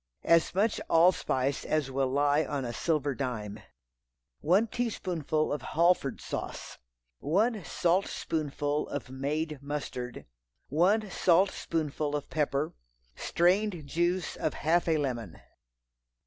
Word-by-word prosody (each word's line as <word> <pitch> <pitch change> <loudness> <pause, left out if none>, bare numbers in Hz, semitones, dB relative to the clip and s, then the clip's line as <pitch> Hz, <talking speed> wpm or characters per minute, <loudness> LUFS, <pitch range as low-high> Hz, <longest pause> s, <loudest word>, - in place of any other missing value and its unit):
As 170 +1 +3
much 210 +3 +1
allspice 155 -5 +3
as 150 -3 -1
will 135 0 +1
lie 145 +3 +2
on 140 -2 -3
a 120 - -4
silver 145 +1 0
dime. 110 -6 -4 0.8
One 190 +8 +3
teaspoonful 180 - -1
of 145 - -3
Halford 170 -2 +2
sauce. - - -6 0.4
One 210 +6 +1
saltspoonful 155 -5 -1
of 140 -3 -5
made 150 +3 -2
mustard. 140 -4 -5 0.4
One 195 - +2
saltspoonful 165 -5 +1
of 145 - -5
pepper. 145 -1 0 0.4
Strained 180 -1 +1
juice 175 +5 0
of 155 - -2
half 170 +3 +1
a 160 -1 +3
lemon. 120 - -3
155 Hz, 110 wpm, -29 LUFS, 140-175 Hz, 0.8 s, As